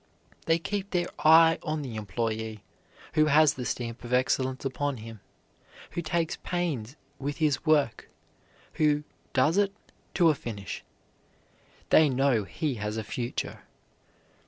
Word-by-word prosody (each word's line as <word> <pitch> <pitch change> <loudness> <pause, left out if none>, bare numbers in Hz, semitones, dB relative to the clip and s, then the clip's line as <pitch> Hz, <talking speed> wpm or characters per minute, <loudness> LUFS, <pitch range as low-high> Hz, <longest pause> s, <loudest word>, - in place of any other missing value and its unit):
They 165 0 +4
keep 200 +3 -3
their 175 -1 0
eye 165 +1 +6
on 155 -2 -3
the 125 -5 -6
employee 110 0 -3 0.5
who 155 -1 +4
has 150 0 +5
the 125 -4 -6
stamp 120 -1 -4
of 120 - -8
excellence 130 +1 +1
upon 140 0 -1
him, 115 0 -9 0.7
who 170 - -3
takes 165 +1 -1
pains 150 -9 -3 0.2
with 145 +1 -3
his 155 -2 0
work, 145 -7 +2 0.6
who 150 -1 +2 0.3
does 150 +7 +3
it 200 -1 +2 0.4
to 170 -3 +5
a - - +1
finish. 110 -8 -6 1.1
They 155 -2 +6
know 130 -5 +2
he 150 - -2
has 105 +1 -2
a 110 - -2
future. 120 +3 -4
140 Hz, 135 wpm, -28 LUFS, 115-160 Hz, 1.1 s, eye